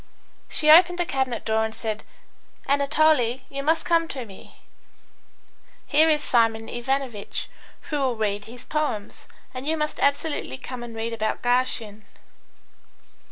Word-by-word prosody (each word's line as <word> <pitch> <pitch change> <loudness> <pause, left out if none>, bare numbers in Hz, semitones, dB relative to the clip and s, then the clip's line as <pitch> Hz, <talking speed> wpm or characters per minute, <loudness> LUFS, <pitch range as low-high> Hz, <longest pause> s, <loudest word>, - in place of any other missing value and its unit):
She 305 0 +4
opened 350 +2 +7
the 350 - +1
cabinet 265 -5 -2
door 220 0 +1
and 220 0 -4
said, 215 -2 -4 0.6
"Anatole, 280 -3 +3
you 275 0 -4
must 320 +3 +1
come 330 -1 +2
to 260 -5 -6
me. 195 -3 -14 1.3
Here 310 +3 +4
is 300 -1 +2
Simeon 225 -2 +2
Ivanovitch, 245 -3 -3 0.4
who 295 - 0
will 260 -3 0
read 205 -2 -2
his 235 +2 -11
poems, 295 -9 -3 0.3
and 255 +2 -6
you 320 +1 +1
must 300 0 -2
absolutely 285 - 0
come 255 - -7
and 235 -1 -8
read 225 +1 -3
about 220 -1 -2
Garshin." 245 -4 0
255 Hz, 140 wpm, -24 LUFS, 225-300 Hz, 1.3 s, opened